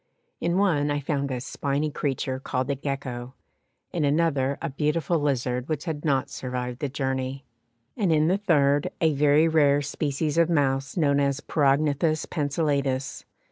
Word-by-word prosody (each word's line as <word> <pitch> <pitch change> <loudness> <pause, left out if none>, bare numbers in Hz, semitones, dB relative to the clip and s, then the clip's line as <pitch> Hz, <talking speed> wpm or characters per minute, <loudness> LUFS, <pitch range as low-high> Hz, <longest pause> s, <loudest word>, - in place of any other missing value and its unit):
In 170 +1 0
one 160 -8 +2
I 145 0 0
found 140 -1 -2
a 130 -2 -2
spiny 140 +4 -2
creature 135 -2 -2
called 130 0 -2
a - - 0
Gecko, 130 -2 -5 0.6
in 170 - 0
another 145 -2 +1
a 165 - -4
beautiful 150 +3 0
lizard 130 -2 -1
which 155 0 -2
had 155 -4 -4
not 140 -2 +1
survived 125 -1 -4
the 145 - -2
journey, 130 -1 -3 0.5
and 200 -7 +1
in 155 0 +3
the 190 +3 +2
third 145 -7 +2
a 160 -2 +3
very 145 +2 +4
rare 145 -3 +3
species 145 +2 -1
of 170 0 +4
mouse 135 -3 0
known 145 -4 +3
as 140 0 +1
Perognathus 150 +2 +1
Pencillatus. 140 -3 -1
145 Hz, 155 wpm, -25 LUFS, 135-155 Hz, 0.6 s, very